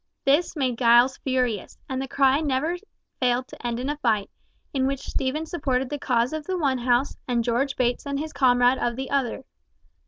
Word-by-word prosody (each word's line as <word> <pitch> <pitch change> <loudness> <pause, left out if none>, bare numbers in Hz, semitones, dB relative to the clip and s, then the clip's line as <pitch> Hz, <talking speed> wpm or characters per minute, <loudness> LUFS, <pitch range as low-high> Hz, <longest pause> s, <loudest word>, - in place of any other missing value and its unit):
This 295 +7 +2
made 255 -5 -1
Giles 240 +2 +5
furious, 250 -6 -1
and 260 0 -3
the 270 - -4
cry 270 +1 +3
never 300 +3 0 0.4
failed 250 0 +1
to 245 - -7
end 235 0 -2
in 255 - -3
a 295 +1 -2
fight, 220 -8 0 0.4
in 265 -1 +1
which 275 0 -2
Stephen 280 +4 -2
supported 270 -5 -1
the 290 - -3
cause 245 0 +1
of 310 -1 -5
the 375 -1 -1
one 275 -6 +1
house, 245 +2 +1
and 240 -2 +1
George 250 +4 0
Bates 245 +2 0
and 280 0 -2
his 310 +2 -4
comrades 245 -1 +3
of 240 -1 0
the 265 +1 -5
other. 270 -2 -1
260 Hz, 195 wpm, -25 LUFS, 245-280 Hz, 0.4 s, Giles